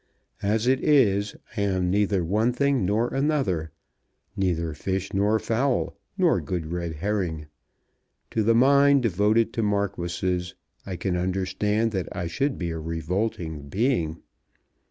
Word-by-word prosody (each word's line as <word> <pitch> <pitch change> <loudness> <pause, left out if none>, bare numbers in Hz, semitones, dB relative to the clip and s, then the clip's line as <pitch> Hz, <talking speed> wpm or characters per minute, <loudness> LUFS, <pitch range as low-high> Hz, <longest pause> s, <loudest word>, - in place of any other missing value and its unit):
As 105 +3 +1
it 130 +1 +2
is, 105 -9 +3 0.2
I 105 - -1
am 95 -3 +1
neither 100 -2 +2
one 110 +8 +1
thing 140 -7 +1
nor 110 +5 0
another; 135 - 0 0.7
neither 85 -5 0
fish 95 +5 -3
nor 100 +3 +2
fowl 125 +4 0 0.2
nor - - +3
good 85 -3 -4
red 85 -2 -3
herring. 85 -3 -2 0.9
To 110 - +1
the 115 +2 +3
mind 140 +2 +5
devoted 110 +3 +2
to 115 - -1
marquises 90 -3 -1 0.3
I 95 - -4
can 90 +1 -2
understand 95 +5 0
that 95 -4 -3
I 90 - -2
should 135 +12 -1
be 85 -2 -3
a 80 - -4
revolting 80 -2 -3
being. 95 - 0
100 Hz, 135 wpm, -25 LUFS, 90-115 Hz, 0.9 s, mind